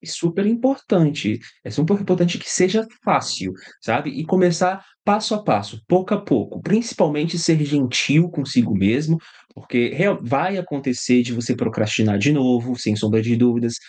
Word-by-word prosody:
E -, -, -19 dB
super 170 Hz, +4 st, -2 dB
importante, 185 Hz, -, +1 dB, 0.2 s
é -, -, -9 dB
super 160 Hz, +8 st, +1 dB
importante 180 Hz, -3 st, +1 dB
que -, -, -11 dB
seja 190 Hz, +5 st, +2 dB, 0.2 s
fácil, 90 Hz, +10 st, 0 dB, 0.3 s
sabe, -, -, -1 dB
e 155 Hz, -, -7 dB
começar 180 Hz, +1 st, +2 dB, 0.2 s
passo 215 Hz, +2 st, +1 dB
a 210 Hz, -, -4 dB
passo, 105 Hz, -, -2 dB
pouco 185 Hz, +3 st, +2 dB
a 205 Hz, -, -3 dB
pouco, -, -, -1 dB
principalmente 175 Hz, -6 st, 0 dB
ser 165 Hz, -2 st, +2 dB
gentil 145 Hz, +3 st, +2 dB
consigo 135 Hz, -, 0 dB
mesmo, 135 Hz, +12 st, +1 dB, 0.3 s
porque 125 Hz, -2 st, -1 dB
real 195 Hz, +3 st, 0 dB
vai 140 Hz, +10 st, -1 dB
acontecer 135 Hz, -7 st, 0 dB
de 120 Hz, -, -5 dB
você 120 Hz, +1 st, -2 dB
procrastinar 110 Hz, -1 st, 0 dB
de 100 Hz, +8 st, +2 dB
novo, 125 Hz, -3 st, +1 dB
sem 110 Hz, -3 st, -1 dB
sombra 110 Hz, +1 st, +1 dB
de 120 Hz, +2 st, 0 dB
dúvidas, 120 Hz, 0 st, +2 dB
145 Hz, 155 wpm, -20 LUFS, 120-185 Hz, 0.3 s, seja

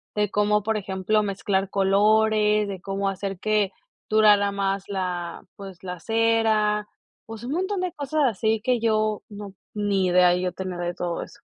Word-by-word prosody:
de 210 Hz, -1 st, +1 dB
cómo, 210 Hz, 0 st, +2 dB
por 220 Hz, 0 st, 0 dB
ejemplo, 195 Hz, +2 st, 0 dB
mezclar 195 Hz, -1 st, -1 dB
colores, 210 Hz, +2 st, +3 dB
de 195 Hz, -2 st, -5 dB
cómo 195 Hz, 0 st, -2 dB
hacer 195 Hz, -1 st, -4 dB
que 210 Hz, -2 st, +1 dB, 0.4 s
durara 210 Hz, -2 st, +5 dB
más 195 Hz, -1 st, -1 dB
la 180 Hz, -3 st, -4 dB
pues 195 Hz, -3 st, -10 dB
la 180 Hz, -1 st, -6 dB
cera, 220 Hz, -1 st, +1 dB, 0.4 s
pues 225 Hz, 0 st, -9 dB
un 270 Hz, -, -3 dB
montón 375 Hz, +2 st, -1 dB
de 365 Hz, -1 st, -2 dB
cosas 295 Hz, -1 st, -1 dB
así 220 Hz, -1 st, 0 dB
que 245 Hz, +1 st, +1 dB
yo 215 Hz, -1 st, 0 dB
no 205 Hz, -1 st, -9 dB, 0.2 s
ni 200 Hz, -3 st, +1 dB
idea 180 Hz, 0 st, +5 dB
yo 180 Hz, 0 st, -1 dB
tenía 185 Hz, -1 st, -5 dB
de 175 Hz, 0 st, -2 dB
todo 175 Hz, -1 st, -3 dB
eso. -, -, -14 dB
205 Hz, 165 wpm, -24 LUFS, 190-215 Hz, 0.4 s, durara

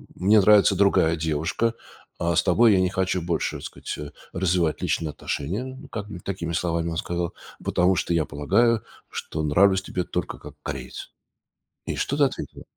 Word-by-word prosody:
мне 105 Hz, +4 st, +5 dB
нравится 100 Hz, 0 st, +6 dB
другая 90 Hz, -4 st, +3 dB
девушка, 80 Hz, +9 st, 0 dB, 0.5 s
а 85 Hz, -1 st, +1 dB
с 85 Hz, -, +5 dB
тобой 110 Hz, +5 st, +5 dB
я 95 Hz, -, +4 dB
не 90 Hz, -, +2 dB
хочу 95 Hz, -1 st, 0 dB
больше, 85 Hz, -1 st, -1 dB
так -, -, -11 dB
сказать, -, -, -6 dB
э, 75 Hz, -1 st, -7 dB, 0.2 s
развивать 90 Hz, -3 st, +1 dB
личные 80 Hz, -, 0 dB
отношения", 100 Hz, -, -4 dB
как 105 Hz, -2 st, -5 dB
бы, 100 Hz, -, -7 dB
такими 90 Hz, -3 st, -4 dB
словами, 85 Hz, 0 st, 0 dB
он 80 Hz, -, -3 dB
сказал: 85 Hz, 0 st, -2 dB, 0.3 s
"Потому 90 Hz, +2 st, +2 dB
что 85 Hz, -, 0 dB
я 85 Hz, -2 st, +2 dB
полагаю, 115 Hz, +11 st, +2 dB, 0.3 s
что 80 Hz, -, -4 dB
нравлюсь 95 Hz, +6 st, +4 dB
тебе 90 Hz, -1 st, -3 dB
только -, -, -3 dB
как -, -, -11 dB
кореец". -, -, -6 dB, 0.7 s
И -, -, -3 dB
что 140 Hz, -, -1 dB
ты 145 Hz, -, +4 dB
ответила? 135 Hz, -, -5 dB
90 Hz, 175 wpm, -25 LUFS, 80-100 Hz, 0.7 s, нравится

